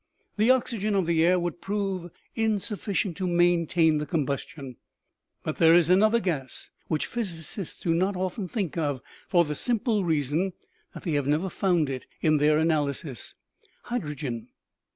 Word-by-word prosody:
" - - -44
The 220 +3 +4
oxygen 230 -5 +2
of 190 -3 +2
the 165 -1 +2
air 180 +2 +4
would 175 0 -3
prove 195 -3 -2 0.2
insufficient 205 -4 -1
to 185 - -1
maintain 170 -2 +3
the 150 - -4
combustion, 140 -4 -3 0.7
but - - -3
there 165 0 +6
is 175 0 +4
another 215 +5 +5
gas 150 - -4 0.2
which 155 -2 0
physicists 190 -5 -4
do 165 - +1
not 190 +4 +1
often 185 +2 -3
think 185 - -3
of, 145 -5 -1 0.2
for 175 -1 +4
the 150 - -3
simple 220 - 0
reason 160 +3 0 0.4
that - - -8
they 170 - -2
have 145 -2 0
never 160 +6 +1
found 175 -6 +1
it 130 -2 -5
in 155 -1 +3
their 150 +1 +4
analyses 150 -4 -1 0.5
hydrogen. 150 - -4
170 Hz, 155 wpm, -27 LUFS, 150-195 Hz, 0.7 s, there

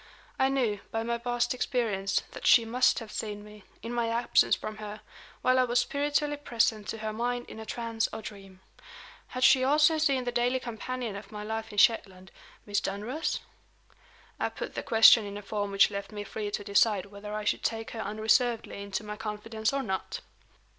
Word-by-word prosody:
I 265 - +4
knew, 240 -7 0
by 225 0 -2
my 235 0 -2
past 240 0 0
experience, 210 -6 0
that - - -4
she 230 - +7
must 250 +3 +3
have 225 -3 -6
seen 205 -1 -5
me, 210 -1 -14 0.2
in 230 +1 -5
my 235 -1 0
absence 235 +1 +3
from 215 -1 -7
her, 210 0 -7 0.4
while 255 0 +4
I - - +5
was 245 0 +2
spiritually 290 +2 0
present 225 -6 0
to 225 - -4
her 215 0 -4
mind 245 +2 -2
in - - -9
a 220 - -8
trance 230 -1 -2
or 220 - -7
dream. 195 -3 -10 0.7
Had 255 0 -4
she 260 -1 +6
also 305 +3 +4
seen 275 -4 +2
the 245 - -2
daily 245 +2 +1
companion 240 -1 -5
of 200 0 -9
my 210 -1 -6
life 220 +1 -4
in 205 - -10
Shetland 190 -4 +2 0.3
Miss 205 -1 0
Dunross? 245 +11 -3 1.0
I - - 0
put - - -6
the - - -3
question 225 0 +7
in 200 0 -6
a 205 - -8
form 205 0 -2
which 195 0 +4
left 200 +1 -5
me 205 -1 -5
free 210 0 -4
to 205 0 -3
decide 200 -1 +3
whether 205 +1 -8
I 215 - -3
should - - +1
take 225 -1 -2
her 225 - -5
unreservedly 220 +1 +1
into 200 +1 -4
my 210 0 -6
confidence 220 +1 -3
or 275 0 -1
not. 190 -5 -3
220 Hz, 195 wpm, -29 LUFS, 210-245 Hz, 1.0 s, she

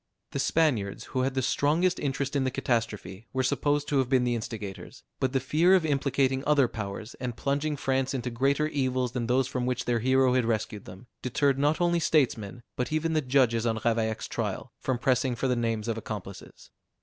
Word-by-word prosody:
The - - -3
Spaniards, 130 -9 +1
who 130 - +1
had 130 +1 -1
the 130 - 0
strongest 155 +8 +2
interest 140 0 -2
in 140 - +2
the 130 - +1
catastrophe, 110 -5 -2
were 130 0 +1
supposed 145 +2 +1
to 140 - +2
have 130 -2 0
been 130 -2 +3
the 120 -1 +1
instigators; 110 -4 -6 0.2
but 130 - +1
the 135 - +1
fear 160 +8 +4
of 180 -4 +2
implicating 135 -2 +1
other 145 -4 +4
powers, 110 0 -6
and 125 -2 -4
plunging 145 +2 -1
France 135 0 0
into 125 -1 -3
greater 140 +5 +1
evils 130 -4 0
than 120 -2 -2
those 130 +1 +2
from 125 -2 -2
which 125 0 -1
their 120 -1 +1
hero 130 +1 +3
had 125 -2 +2
rescued 110 -2 -2
them, 95 +5 -11 0.2
deterred 135 +2 +1
not 145 +2 +2
only 175 -1 +2
statesmen, 120 - +1
but 125 - -2
even 160 +1 0
the 155 - +2
judges 125 -4 +2
on 110 -1 0
Ravaillac's 110 -1 0
trial, - - -4
from 130 -2 -1
pressing 130 0 +1
for 135 +2 -1
the 125 - +2
names 115 -2 -1
of 115 -1 -1
accomplices. 100 -3 -8
130 Hz, 200 wpm, -28 LUFS, 115-140 Hz, 0.2 s, fear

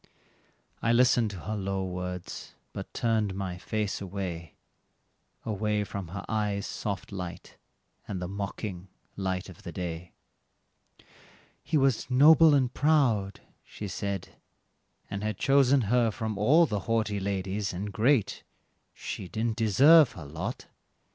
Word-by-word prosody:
I 115 - +2
listened 120 -2 +4
to 95 -4 -8
her 105 +8 -4
low 95 -1 -2
words, 90 -1 -6 0.2
but - - -7
turned 110 -4 0
my 95 -2 -4
face 105 +1 -2
away 90 -4 -5 0.9
Away 105 0 0
from 100 -2 -6
her 100 +4 -7
eyes' 105 -2 -1
soft 100 -1 -4
light, 90 -2 -7 0.5
and 95 - -4
the 90 - -4
mocking 100 -1 -5 0.3
light 95 -1 -2
of 95 -4 -13
the 85 - -7
day. 85 0 -6 1.5
"He 160 - 0
was 135 -4 +1
noble 150 +4 +7
and 130 -3 +1
proud," 125 -10 +2 0.2
she 105 - -8
said, 100 -1 -4 0.8
"and 100 - -5
had 105 -2 -2
chosen 135 -1 +4
her 115 +2 +2
from 110 0 -4
all 145 +12 +5
The 105 -9 -2
haughty 110 -3 +1
ladies, 100 +1 -2
and 100 +3 -5
great; 115 +2 +2 0.5
she 95 - -6
didn't 110 +3 -2
deserve 130 - +6
her 85 - -9
lot." 80 +3 -5
105 Hz, 135 wpm, -28 LUFS, 95-115 Hz, 1.5 s, noble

